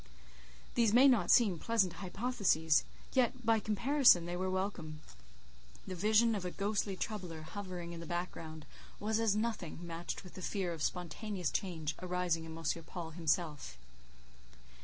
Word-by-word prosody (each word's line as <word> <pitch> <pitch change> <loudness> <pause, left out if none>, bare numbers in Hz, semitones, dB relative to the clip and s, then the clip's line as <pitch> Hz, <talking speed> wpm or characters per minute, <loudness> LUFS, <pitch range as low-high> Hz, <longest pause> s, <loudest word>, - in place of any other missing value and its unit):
These 230 -3 +3
may 255 +4 +8
not 250 -5 +4
seem 200 -8 +5
pleasant 200 -5 +1
hypotheses; 185 - +2 0.3
yet, 255 -1 +1
by 225 0 +4
comparison, 215 - +4
they 175 +1 -3
were 185 +1 -1
welcome. 185 -5 -3 0.9
The 190 - -5
vision 215 +5 +3
of 200 -4 -2
a 180 - -2
ghostly 200 +1 -1
troubler 180 -7 -4
hovering 175 -1 -6
in 170 - -7
the 170 - -8
background, 165 -3 -5 0.3
was 220 +1 0
as 225 -3 +2
nothing, 215 -6 -2
matched 170 +2 -5
with 180 - -12
the 185 - -9
fear 185 -3 -2
of 160 - -8
spontaneous 180 +2 -2
change 160 -5 -2
arising 180 -2 -1
in 160 0 -8
M. 165 - -9 0.2
Paul 170 -2 -6
himself. 160 - -1
185 Hz, 150 wpm, -34 LUFS, 165-215 Hz, 0.9 s, may